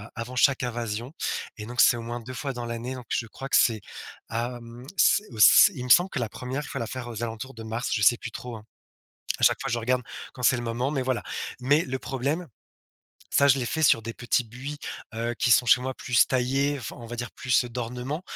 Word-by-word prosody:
avant 120 +2 -6
chaque 130 +1 +3
invasion 120 +1 -4 0.4
et 105 - -6
donc, 120 +2 +1
c'est 120 - +6
au - - -5
moins 120 +1 -4
2 125 +2 -9
fois 135 +2 -4
dans 120 -1 -5
l'année. 120 +2 -4
Donc, 125 -2 -9
je 115 - -1
crois 135 +5 -8
que - - +5
c'est, 110 -3 +3 0.5
hem, 120 +1 -5
c 205 - +4 0.2
c 100 - +8
il 125 - -5
me - - -7
semble 175 +9 +6
que - - -2
la 115 -3 -2
1re 130 +6 -5
fois, - - -5
la 115 - -3
faire 125 +1 -6
aux 120 -1 -5
alentours 115 +3 -5
de 115 - -8
mars, 115 +2 -3
je 105 - 0
sais 120 +4 +6
plus 115 - -7
trop, 125 0 -7
hein. 105 - -13 0.8
À - - -5
chaque - - +5
fois, - - -3
je 120 - 0
regarde 125 +2 0 0.3
quand 125 - -9
c'est 125 - +4
le 120 - -4
moment, 120 +4 -1
mais 140 -3 -1
voilà. 130 -1 -1 0.4
Mais 145 +5 +3
le 130 0 -3
problème, 140 +7 -2 0.8
ça, 140 - +4
je 135 0 +5
l'ai 125 - -2
fait 160 - -2
sur 130 -6 +5
des 115 +1 -6
petits 125 +1 +1
buis, 130 +6 -7 0.4
heu, 115 +1 -2
qui 120 - +2
sont 125 +1 +5
chez 125 +2 +5
moi, 130 +1 -2
plus 125 -2 +3
taillés, 135 +3 +1
enfin, 125 - -7
on 120 - -10
va 120 - -6
dire, 120 -2 -4
plus 130 0 +1
d'ornement, 125 +6 -4
125 Hz, 240 wpm, -26 LUFS, 115-130 Hz, 0.8 s, c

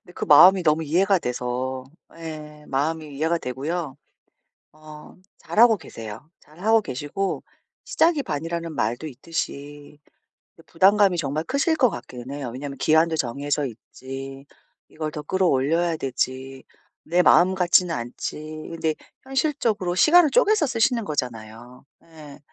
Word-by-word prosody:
근데 175 - -17
그 - - -4
마음이 180 +5 +7
너무 155 0 +2
이해가 185 +5 +2
돼서 125 0 -3 0.3
예 155 -2 -9
마음이 150 +1 -2
이해가 160 +4 0
되고요. 145 +3 -4 0.8
어 155 0 -13 0.2
잘하고 225 0 +4
계세요. 115 - -10
잘하고 205 +9 +1
계시고 145 +7 -4 0.4
시작이 325 -3 +2
반이라는 165 - -4
말도 120 +7 -2
있듯이 145 0 -6 0.6
이 165 - -17
부담감이 195 +2 +4
정말 155 0 -2
크실 285 - 0
것 255 -6 +3
같기는 125 -7 -9
해요. 140 -3 -5
왜냐하면 140 +2 -7
기한도 160 +1 +3
정해져 145 +2 -2
있지, 135 +4 -9 0.4
이걸 155 -1 -5
더 150 - -7
끌어올려야 165 0 +1
되지, 130 -1 -4 0.4
내 175 +3 +2
마음 180 +1 +5
같지는 180 -1 +3
않지, 120 +1 -5 0.3
근데 160 -1 -2 0.3
현실적으로 260 - -1
시간을 315 - +5
쪼개서 430 -8 +3
쓰시는 230 -1 +1
거잖아요. 120 - -6 0.2
예. 155 -3 -13
155 Hz, 305 characters per minute, -23 LUFS, 135-180 Hz, 0.8 s, 마음이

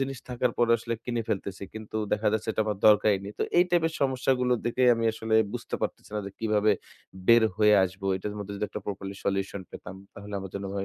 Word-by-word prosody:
জিনিস 135 -1 -2
থাকার 125 0 0
পরে 120 -1 +3
আসলে 115 +1 -4
কিনে 120 -2 -2
ফেলতেছি। 100 -1 -3
কিন্তু 110 0 -7 0.2
দেখা 105 +1 +2
যাচ্ছে 110 0 -2
এটা - - -1
আমার 105 -2 -2
দরকারই 105 -1 +5
নেই। 100 - -7
তো - - +1 0.2
এই 175 - +7
টাইপের 165 -2 +2
সমস্যাগুলো 130 -2 +1
দেখে 120 +2 0
আমি 115 0 -2
আসলে 110 0 -2 0.2
বুঝতে - - -5
পারতেছি - - -4
না - - 0
যে - - -6
কিভাবে 105 -1 +2 0.5
বের 115 -1 +7
হয়ে 105 -1 +5
আসব। 95 +2 -7
এটার 105 +2 -5
মধ্যে 100 0 -6
যদি 100 - -2
একটা 105 - -6
প্রপারলি 100 -1 -5
সলিউশন 100 0 -1
পেতাম 90 - -9 0.2
তাহলে 100 +1 -8
আমার 95 -1 -7
জন্য 100 0 -4
ভাই 100 -1 -2
105 Hz, 215 wpm, -27 LUFS, 100-120 Hz, 0.5 s, এই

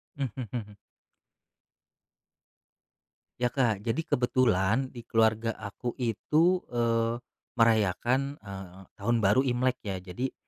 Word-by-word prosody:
Mhm 140 -3 -2 0.2
mhm. 105 -4 -6 2.6
Ya, 125 -1 0
Kak, 115 -7 +1
jadi 115 +7 0
kebetulan 125 - +2
di 120 -3 -10
keluarga 115 0 +2
aku 110 +4 -5
itu, 155 - +2
eee, 115 0 +1 0.3
merayakan, 115 +4 +2
eee, 95 -2 -9 0.2
Tahun 115 +4 +1
Baru 105 +7 +4
Imlek 125 0 +1
ya. 95 -2 -3
Jadi, 95 +9 -4
115 Hz, 105 wpm, -29 LUFS, 105-130 Hz, 2.6 s, Baru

